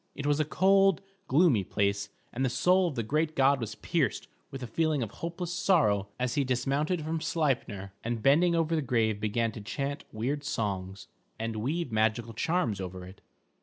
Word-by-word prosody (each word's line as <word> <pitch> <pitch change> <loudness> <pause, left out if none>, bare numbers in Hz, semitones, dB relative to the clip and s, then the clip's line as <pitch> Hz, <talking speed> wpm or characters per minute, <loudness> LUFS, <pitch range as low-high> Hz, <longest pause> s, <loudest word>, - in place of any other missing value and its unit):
It 145 - -5
was 145 0 +2
a 155 - +2
cold, 195 +3 +3 0.2
gloomy 135 - +4
place, 100 +1 -1 0.2
and 130 - -1
the 130 - +2
soul 180 +9 +3
of 155 - -4
the 115 - -1
great 155 +7 0
god 135 0 +4
was 110 -1 -4
pierced 155 +1 -1 0.2
with 135 -2 -7
a - - -2
feeling 150 +3 0
of 110 - -6
hopeless 170 +1 -5
sorrow 145 - +2
as 125 -1 0
he 145 - +1
dismounted 140 +6 0
from 160 +1 -2
Sleipner, 120 - -1
and 115 -1 -3
bending 170 +5 +4
over 165 0 +1
the 155 - +1
grave 115 -5 +1
began 110 +2 0
to 110 - -8
chant 140 +6 -4
weird 135 +7 -2
songs, 100 -8 -3 0.3
and 115 0 -3
weave 140 +6 -2
magical 110 +1 0
charms 120 - 0
over 90 0 -6
it. 95 +2 -13
130 Hz, 185 wpm, -29 LUFS, 110-160 Hz, 0.3 s, gloomy